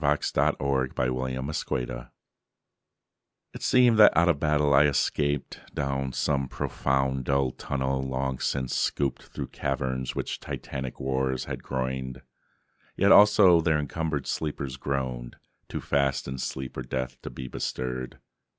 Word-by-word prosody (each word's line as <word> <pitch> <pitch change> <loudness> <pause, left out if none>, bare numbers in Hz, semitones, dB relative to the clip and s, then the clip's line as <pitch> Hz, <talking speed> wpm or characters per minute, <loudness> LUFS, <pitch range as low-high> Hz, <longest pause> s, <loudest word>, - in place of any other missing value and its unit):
Wilfred 75 0 +2
Owen 65 0 -1
Strange 60 -4 -2
Meeting - - -7 1.5
IT - - -9
seemed 120 -3 +4
that 105 - +8
out 85 +1 +5
of 75 -4 +2
battle 75 -1 +2
I 70 +2 +7
escaped 70 0 0
Down 70 -1 -1
some 70 0 0
profound 65 0 -1
dull 70 -1 +2
tunnel, 65 0 -2
long 65 0 -2
since 65 -2 -1
scooped 70 -3 0
Through - - -7
caverns 65 -1 -2
which - - -3
titanic 65 -2 -6
wars 65 -1 -1
had - - -5
groined, 65 0 -4 0.7
Yet 100 +1 +4
also 100 -4 +7
there 80 -2 +2
encumbered 75 -1 -2
sleepers 70 -4 -3
groaned, 65 -3 -3 0.3
Too - - -4
fast 70 -2 0
in 65 0 -5
sleep 65 0 -4
or - - -2
death 65 +1 -4
to - - -6
be 65 - -7
bestirred. 65 0 -4
65 Hz, 135 wpm, -27 LUFS, 65-70 Hz, 1.5 s, that